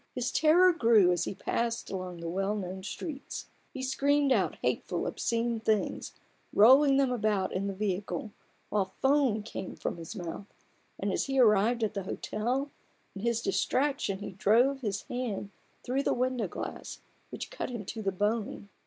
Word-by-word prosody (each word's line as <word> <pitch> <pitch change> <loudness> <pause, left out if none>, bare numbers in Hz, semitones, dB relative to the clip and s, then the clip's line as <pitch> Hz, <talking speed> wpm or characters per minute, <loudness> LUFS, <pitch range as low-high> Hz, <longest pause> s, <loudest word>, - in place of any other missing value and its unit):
His 250 -1 -1
terror 350 +4 +5
grew 225 - +5
as 175 - 0
he - - -4
passed 235 +3 -2
along 185 -3 -5
the 170 - -4
well 195 +4 -1
known 190 -2 -5
streets: 275 - -6 0.3
he 265 -3 -6
screamed 280 +1 +2
out - - +2
hateful, - - -1
obscene 230 0 -1
things, 220 -1 -1 0.4
rolling 270 +5 +7
about 215 -7 +1
in 195 +2 -1
the 200 - -2
vehicle, 195 0 -2 0.4
while 195 -3 -1
foam 265 -6 +3
came 210 - -6
from - - -4
his 165 +6 -8
mouth; 180 +1 -6 0.5
and - - -1
as - - 0
he 270 -1 0
arrived 225 0 +4
at 215 - 0
the 200 - -2
hotel, 245 +8 -2 0.4
in 195 - -6
his 235 0 0
distraction 270 -7 0
he 205 - -6
drove 235 +8 +3
his 205 -4 -2
hand 230 -5 -4 0.3
through 260 +3 0
the - - +1
window 250 -3 0
glass, - - -7 0.3
which - - -7
cut - - -4
him 250 - -5
into 220 +3 -6
the 195 -2 0
bone. 205 +1 -2
220 Hz, 165 wpm, -30 LUFS, 195-255 Hz, 0.5 s, rolling